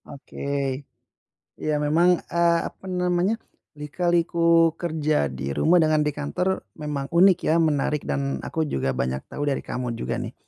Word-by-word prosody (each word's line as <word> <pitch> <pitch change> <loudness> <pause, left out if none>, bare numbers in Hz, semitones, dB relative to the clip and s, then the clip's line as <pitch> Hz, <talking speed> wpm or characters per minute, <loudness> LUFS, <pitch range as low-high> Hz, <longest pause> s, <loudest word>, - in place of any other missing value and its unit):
Oke. 140 -1 -3 0.8
Ya 155 -1 -1
memang, 165 +4 +3
eee, 170 0 +3
apa - - -11
namanya, 180 +3 +1 0.4
lika-liku 170 +1 +2
kerja 155 - 0
di 65 0 -5
rumah 165 - +3
dengan 155 -1 +3
di - - +2
kantor 180 +6 -2 0.2
memang 145 -2 -4
unik 180 +1 +5
ya, 155 - +3
menarik 150 -2 +1
dan 140 0 -1
aku 160 -1 -2
juga 65 - -1
banyak 65 +1 -2
tahu 145 - -6
dari 135 - -2
kamu 125 -2 -4
juga - - -3
nih. - - -5
155 Hz, 150 wpm, -24 LUFS, 140-170 Hz, 0.8 s, unik